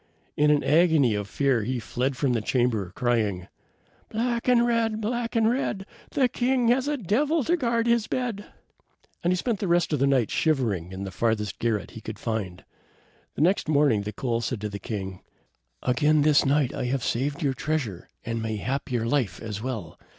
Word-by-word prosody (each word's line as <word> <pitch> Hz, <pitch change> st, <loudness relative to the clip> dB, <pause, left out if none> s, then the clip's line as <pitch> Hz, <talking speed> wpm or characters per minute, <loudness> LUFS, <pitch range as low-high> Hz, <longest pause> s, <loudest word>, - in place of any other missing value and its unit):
In 150 Hz, 0 st, +3 dB
an 150 Hz, -1 st, +3 dB
agony 155 Hz, -5 st, +4 dB
of 105 Hz, -1 st, -3 dB
fear 135 Hz, -2 st, +1 dB
he 125 Hz, +4 st, -2 dB
fled 125 Hz, +4 st, -2 dB
from 140 Hz, -5 st, +1 dB
the 115 Hz, -, 0 dB
chamber, 110 Hz, -5 st, 0 dB
crying, 105 Hz, -7 st, 0 dB, 0.6 s
"Black 235 Hz, +2 st, -1 dB
and 240 Hz, -1 st, +5 dB
red! 230 Hz, -2 st, +1 dB
black 235 Hz, +2 st, -2 dB
and 225 Hz, -1 st, +4 dB
red! 225 Hz, -5 st, -1 dB, 0.2 s
The 270 Hz, -3 st, +2 dB
king 245 Hz, -1 st, +1 dB
has 255 Hz, +3 st, +2 dB
a 295 Hz, 0 st, 0 dB
devil 280 Hz, -, +1 dB
to 345 Hz, -, +2 dB
guard 235 Hz, -7 st, 0 dB
his 235 Hz, -2 st, +2 dB
bed." 235 Hz, -5 st, -3 dB, 0.8 s
And 175 Hz, -, +2 dB
he 180 Hz, -, +2 dB
spent 225 Hz, +1 st, -1 dB
the 200 Hz, -, -2 dB
rest 170 Hz, -2 st, +2 dB
of 150 Hz, -, +1 dB
the 140 Hz, -, +3 dB
night 130 Hz, -5 st, +2 dB
shivering 115 Hz, -, 0 dB
in 95 Hz, +1 st, -6 dB
the 95 Hz, -, -5 dB
farthest 105 Hz, 0 st, -1 dB
garret 110 Hz, -4 st, -1 dB
he 110 Hz, -, -10 dB
could 110 Hz, -1 st, -7 dB
find. 100 Hz, -6 st, -4 dB, 0.7 s
The -, -, -3 dB
next 180 Hz, +3 st, +2 dB
morning 145 Hz, -8 st, +3 dB
the 105 Hz, +1 st, -4 dB
coal 115 Hz, +2 st, -2 dB
said 120 Hz, 0 st, -3 dB
to 105 Hz, -, -3 dB
the 100 Hz, 0 st, -6 dB
king: 95 Hz, -2 st, -5 dB, 0.6 s
"Again 150 Hz, +4 st, +3 dB
this 150 Hz, -1 st, +4 dB
night 140 Hz, -2 st, +2 dB
have -, -, -6 dB, 0.2 s
I -, -, -4 dB
saved 140 Hz, +6 st, -1 dB
your 140 Hz, -2 st, +1 dB
treasure, 130 Hz, -, -3 dB, 0.2 s
and 115 Hz, 0 st, -2 dB
mayhap 115 Hz, +6 st, -3 dB
your 120 Hz, -2 st, 0 dB
life 115 Hz, -8 st, 0 dB
as 105 Hz, -2 st, -5 dB
well. 110 Hz, -10 st, -5 dB
135 Hz, 195 wpm, -26 LUFS, -, 0.8 s, and